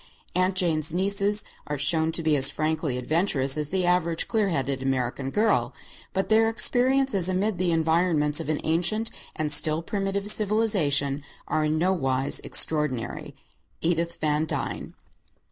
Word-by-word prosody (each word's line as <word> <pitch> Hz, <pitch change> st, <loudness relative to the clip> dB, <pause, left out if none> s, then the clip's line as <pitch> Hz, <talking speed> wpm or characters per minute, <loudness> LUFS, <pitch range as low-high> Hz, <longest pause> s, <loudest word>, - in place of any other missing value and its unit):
Aunt 185 Hz, +1 st, +1 dB
Jane's 165 Hz, -3 st, 0 dB
nieces 200 Hz, +2 st, +2 dB, 0.2 s
are 150 Hz, -, -3 dB
shown 160 Hz, +3 st, +1 dB
to 165 Hz, -, -1 dB
be 155 Hz, -1 st, +2 dB
as 135 Hz, 0 st, +5 dB
frankly 155 Hz, -3 st, -2 dB
adventurous 140 Hz, -1 st, +2 dB
as 150 Hz, -1 st, -2 dB
the 185 Hz, 0 st, 0 dB
average 175 Hz, -2 st, +1 dB
clear 215 Hz, -4 st, 0 dB
headed 135 Hz, -4 st, -2 dB
American 130 Hz, 0 st, -2 dB
girl, 215 Hz, +9 st, 0 dB, 0.4 s
but 190 Hz, -, -2 dB
their 225 Hz, 0 st, +3 dB
experiences 245 Hz, -4 st, +2 dB
amid 190 Hz, +1 st, -1 dB
the 185 Hz, -1 st, +1 dB
environments 160 Hz, -2 st, +1 dB
of -, -, -5 dB
an 155 Hz, -, -1 dB
ancient 175 Hz, +8 st, 0 dB, 0.2 s
and 155 Hz, -1 st, -2 dB
still 155 Hz, +2 st, +3 dB
primitive 195 Hz, +1 st, -3 dB
civilization 195 Hz, -11 st, +1 dB, 0.3 s
are 155 Hz, -, 0 dB
in 155 Hz, +1 st, 0 dB
no 180 Hz, +4 st, +1 dB
wise 135 Hz, -5 st, 0 dB
extraordinary. 150 Hz, -7 st, -1 dB, 0.5 s
EDITH 170 Hz, 0 st, -1 dB
VAN 155 Hz, 0 st, 0 dB
DYNE. -, -, -4 dB
165 Hz, 145 wpm, -25 LUFS, 150-195 Hz, 0.5 s, as